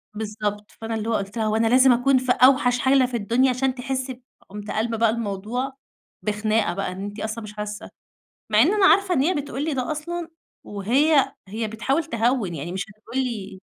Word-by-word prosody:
بالضبط، 210 -1 -4
فأنا 225 0 -3
اللي 220 0 -3
هو - - +1
قُلت 200 +1 -3
لها: 220 - 0
"هو 215 - +1
أنا 225 +1 +2
لازم 255 +3 +6
أكون 255 +3 +3
في 255 0 +1
أوحش 255 -1 +4
حالة 260 +1 +4
في 245 -1 -2
الدنيا 235 +5 +2
عشان 255 +1 0
تحِسِّي 260 0 -3
ب" 250 - -19 0.3
قُمت 210 +1 -7
قالبة 225 +1 -1
بقى 230 0 +3
الموضوع 230 +4 -3 0.5
بخناقة 215 0 0
بقى، 195 0 -3
إن 190 +2 -6
أنتِ 205 +1 -6
أصلًا 220 +2 -4
مش 210 -1 -9
حاسّة. 210 0 -6 0.6
مع 210 - +3
إن 355 - +3
أنا 405 -2 +4
عارفة 380 -1 +4
إن 265 - +2
هي 350 +6 +2
بتقول 290 -1 -3
لي 315 -2 -1
ده 255 +3 -2
أصلًا 340 +2 -5 0.4
وهي 265 +9 +2 0.2
هي 220 +2 -3
بتحاول 235 +9 -1
تهوِّن، 230 -6 0
يعني 165 +3 -5
مش 190 +1 -3
هتقول 230 +4 -6
لي 205 -6 -6
230 Hz, 205 wpm, -23 LUFS, 210-265 Hz, 0.6 s, لازم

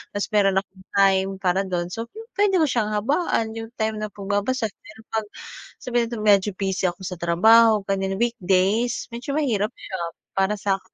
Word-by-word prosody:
tapos 205 - -2
meron 195 -2 +3
akong 190 -1 -20
time 195 -1 +4
para 190 +1 +1
dun, 175 -1 -2
so, 230 +3 -4
pupuwede 415 - -1
ko - - +5
siyang 215 -4 0
habaan 230 - 0
yung 225 - -6
time 220 -1 -1
na 215 - -2
pagbabasa. 205 +3 -1
Pero 220 +1 -16
'pag 220 -1 -1 0.6
sabihin 240 -1 0
natin 230 -2 -5
medyo 205 -1 +4
busy 190 -1 -1
ako 175 +1 -5
sa 180 -1 -5
trabaho, 215 +5 +5
ganiyan, 195 0 -1
weekdays, 220 0 +1
medyo 245 +4 -4
mahirap 240 -6 0
siya 190 - -7 0.4
para 195 +2 +2
sa'kin, 195 -1 -3
210 Hz, 170 wpm, -23 LUFS, 195-230 Hz, 0.6 s, ko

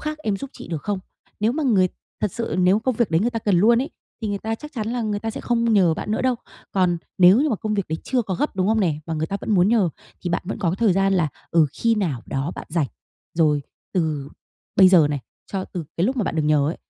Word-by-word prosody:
khác 305 0 -4
em 215 -10 -1
giúp 275 +6 -7
chị - - -11
được 160 -4 -4
không?" 205 -2 -1 0.4
Nếu 220 +3 +2
mà 310 +3 -2
người 200 -9 +3 0.3
thật 210 - 0
sự, 230 - -3
nếu 185 +3 +4
công 255 +3 0
việc 225 -4 +1
đấy 160 - +3
người 235 +4 +1
ta 230 - -2
cần 205 -4 +2
luôn 230 +5 +5
ấy, 275 - -6 0.3
thì 215 - -1
người 200 -1 -1
ta 220 +2 -2
chắc 300 +6 -10
chắn 220 -4 -3
là 240 0 -1
người 210 -2 -1
ta 225 - -2
sẽ - - -6
không 235 -1 +1
nhờ 180 -6 +4
bạn 210 - -5
nữa 215 - 0
đâu. 255 -1 +2 0.4
Còn 180 -3 +2 0.2
nếu 185 +6 +7
như 305 - +2
mà 225 - +1
công 215 +1 -2
việc 200 -3 0
đấy 160 +1 -2
chưa 255 -2 +1
có 190 -4 -3
gấp, 295 - -2
đúng 185 +1 +1
không 220 0 +3
nè, 160 -6 +1
mà 165 - -2
người 155 0 -1
ta 200 - -2
vẫn - - -4
muốn 180 0 +4
nhờ, 215 -5 +3 0.3
thì 175 - -3
bạn 170 - 0
vẫn 205 +4 -4
có 180 -5 +1
cái 180 - -2
thời 220 -2 +3
gian 195 +1 +2
là, 175 -5 +2 0.2
ừ, 165 -2 +5
khi 230 +6 +1
nào 165 - -1
đó 135 +4 -2
bạn - - -8
rảnh. 160 -3 +1 0.5
Rồi 150 -3 +3 0.3
từ 155 -6 -1 0.5
bây 190 -1 +8
giờ 170 -6 +6
này, 145 -2 -2 0.3
cho 190 -1 -1
từ 175 -4 -6
cái 175 - +2
lúc 260 +3 -1
mà 235 - +1
bạn - - -2
được 155 - +2
nhờ 150 -1 +3
ấy, 165 - -3
195 Hz, 290 wpm, -23 LUFS, 170-225 Hz, 0.5 s, bây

